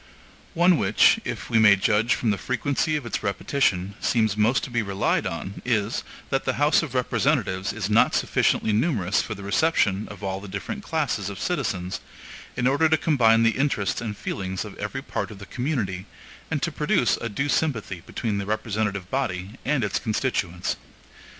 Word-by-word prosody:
One 175 0 +5
which, 100 +2 +4
if - - -5
we 115 - +4
may 105 -2 +7
judge 105 +4 +2
from 115 - 0
the 100 - 0
frequency 140 - 0
of 145 -4 -3
its 120 - -3
repetition, 100 -2 0
seems 110 -4 +2
most 110 +5 +2
to 135 - -5
be 120 -1 +1
relied 100 -1 0
on, 95 - -5
is, 115 -2 0 0.3
that 135 -1 +1
the - - 0
House 145 +2 +4
of 145 -6 -6
Representatives 120 -7 +1
is 105 -4 -3
not 105 +1 +4
sufficiently 110 - +1
numerous 105 - +1
for 110 - -5
the 100 - -9
reception 105 -3 +1
of 105 0 -10
all 95 0 -2
the 105 - -9
different 205 - -5
classes 140 - -1
of 100 - -7
citizens, 100 - -2 0.6
in 125 - 0
order 145 +5 +3
to 160 - +4
combine 115 -8 +4
the 115 +2 +2
interests 120 -10 0
and 105 -3 -4
feelings 95 -1 -4
of - - -9
every - - -4
part - - -3
of 105 - -10
the 100 - -10
community, 105 - -3 0.4
and - - -2
to - - 0
produce - - +1
a 115 - -2
due 135 +7 -2
sympathy 115 - -1
between 105 -3 -2
the 100 - -4
representative 105 -3 -2
body 95 -8 -2
and 140 -3 +1
its 100 -2 0
constituents. 95 -6 -1
110 Hz, 180 wpm, -25 LUFS, 100-135 Hz, 0.6 s, may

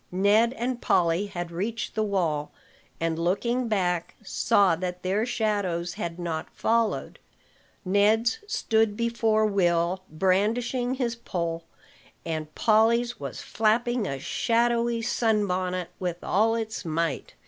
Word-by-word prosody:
Ned 205 +6 +3
and 245 0 -3
Polly 175 +3 +2
had 175 -3 -5
reached 220 +7 -3
the 220 - -1
wall, 170 -8 -1 0.5
and, 165 0 -1
looking 235 +8 0
back, 180 -5 -1
saw 195 -2 +3
that 180 0 -4
their 200 +5 0
shadows 200 -7 -1
had 170 0 -5
not 170 -3 -4
followed. 230 -1 0 0.7
Ned's 215 - +3
stood 220 - +1
before 225 -2 +2
Will, 180 -2 +1
brandishing 225 +9 +1
his 240 -3 -1
pole; 170 -7 -4 0.6
and 155 -2 -4
Polly's 230 +2 +3
was 140 -3 -6
flapping 225 +1 +1
a 135 - -3
shadowy 235 - +1
sun 225 -3 +1
bonnet 180 -1 -2
with 175 -2 -3
all 220 +4 +2
its 220 -2 -4
might. 165 -3 -2
205 Hz, 125 wpm, -26 LUFS, 175-230 Hz, 0.7 s, Ned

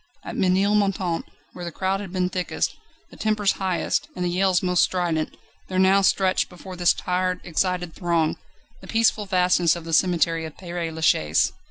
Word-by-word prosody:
At - - -6
Ménilmontant, 195 -2 +1 0.3
where 180 - -8
the 170 - -5
crowd 190 +3 -1
had 195 -3 -7
been 180 -1 0
thickest, 180 -1 -2 0.4
the - - -14
tempers 215 -2 +1
highest, 190 +8 -1
and 180 - -2
the 175 - 0
yells 185 -1 +2
most 180 -1 +2
strident, 170 -4 -1 0.3
there 185 - -3
now 190 +1 +5
stretched 190 -1 +2
before 185 +1 -10
this 175 -1 +4
tired, 180 0 -1
excited 180 0 -1
throng, 170 -3 0 0.4
the - - -13
peaceful 225 -2 +1
vastness 180 -3 +3
of 170 -1 -8
the 165 - -5
cemetery 165 -1 +2
of 155 - -9
Père 175 -2 -4
Lachaise. 155 - +2
180 Hz, 170 wpm, -24 LUFS, 170-190 Hz, 0.4 s, now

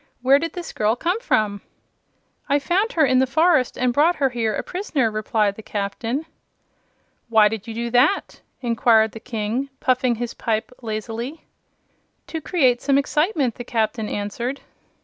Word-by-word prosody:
"Where 270 +2 +6
did 330 +1 -4
this 355 -2 -7
girl 215 +2 +1
come 350 - -1
from?" 210 - 0 0.9
"I 285 - +4
found 375 - 0
her 315 -3 +4
in 255 -1 +3
the 260 - +3
forest 315 -2 +2
and 250 -1 +1
brought 315 +7 +4
her 275 -3 +1
here 225 -3 -1
a - - -3
prisoner," 305 - -1
replied 215 -1 0
the 220 - -11
Captain. 220 +7 -3 1.0
"Why 220 -2 +6
did 220 +1 -5
you 225 - -6
do 235 0 -3
that?" 255 +10 +2 0.2
inquired 230 -2 +3
the 225 - -9
King, 230 +3 -3
puffing 255 -3 +2
his 240 +1 -4
pipe 220 0 -2
lazily. 230 +6 -5 0.8
"To 320 - -5
create 260 -8 +2
some 275 -1 +2
excitement," 300 - +1
the 245 - -8
Captain 220 -2 -1
answered. 235 +6 -3
245 Hz, 160 wpm, -22 LUFS, 220-285 Hz, 1.0 s, Where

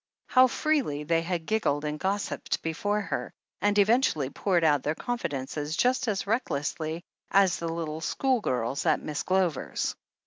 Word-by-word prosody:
How 255 0 +6
freely 255 - 0
they 165 +2 +2
had 170 -1 -3
giggled 155 -9 0
and 150 0 -3
gossiped 195 +1 -2
before 205 +6 -1
her, - - -3 0.3
and 205 0 +2
eventually 200 - +3
poured 180 -4 +1
out 145 -3 +4
their 150 +3 -1
confidences 150 - -3
just 255 0 +2
as 200 -3 -1
recklessly 165 - -2 0.3
as 195 -2 +4
the 170 - -3
little 160 -1 -4
schoolgirls 160 - 0
at 155 - +4
Miss 150 -1 -4
Glover's 185 -6 0
170 Hz, 145 wpm, -28 LUFS, 150-210 Hz, 0.3 s, How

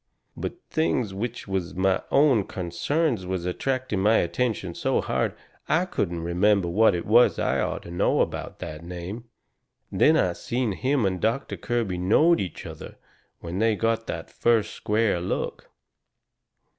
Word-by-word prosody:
But - - -4
things 125 -10 0
which 115 +4 -4
was 95 -2 -3
my 95 +1 +2
own 135 -8 +4
consarns 95 - -1
was 90 -2 -3
attracting 130 +3 -1
my 105 +4 +4
attention 110 -8 -1
so - - 0
hard - - -1 0.3
I 165 +4 +3
couldn't 85 - -2
remember 95 +2 +2
what 105 +4 +4
it 85 - -3
was 120 +4 +5
I - - +1
orter 85 - -3
know 85 - +2
about - - -3
that 75 +1 -7
name. 90 +6 -7 0.7
Then 160 +1 +4
I 90 - +2
seen 120 +4 -2
him 130 +4 0
and 95 -2 -1
Doctor 115 +5 -1
Kirby 115 -7 -2
knowed 155 - +4
each 90 -4 -5
other - - -9 0.5
when 85 +2 -4
they 110 0 +3
got 115 +1 0
that - - -5
first 115 -3 +1
square 105 -3 +1
look. 90 - -3
105 Hz, 150 wpm, -25 LUFS, 90-120 Hz, 0.7 s, was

